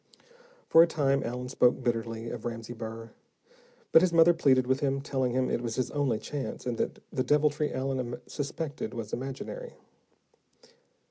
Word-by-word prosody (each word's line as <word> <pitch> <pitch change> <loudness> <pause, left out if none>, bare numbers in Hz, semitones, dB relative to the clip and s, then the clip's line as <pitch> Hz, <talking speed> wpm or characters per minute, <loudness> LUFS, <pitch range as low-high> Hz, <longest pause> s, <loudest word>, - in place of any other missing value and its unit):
For 165 - +7
a 170 - +6
time, 140 -4 +1
Allen 125 +2 -4
spoke 125 -1 +2
bitterly 115 -1 -2
of 120 -2 -6
Ramsey 115 0 -5
Burr, 115 0 -7 0.8
but 160 - +8
his 185 -1 +3
mother 165 +1 +6
pleaded 130 -6 +3
with 130 +1 +1
him, 135 -2 0
telling 130 -3 -1
him 130 0 +1
it - - -1
was 115 -2 -3
his 130 - -1
only 140 -6 +1
chance, 140 +4 -5
and 120 -2 -2
that - - -2
the 130 - 0
deviltry 150 +2 +2
Allen 130 -2 -2
suspected 145 0 -4
was 115 -3 -6
imaginary. 135 - -5
130 Hz, 160 wpm, -29 LUFS, 120-145 Hz, 0.8 s, but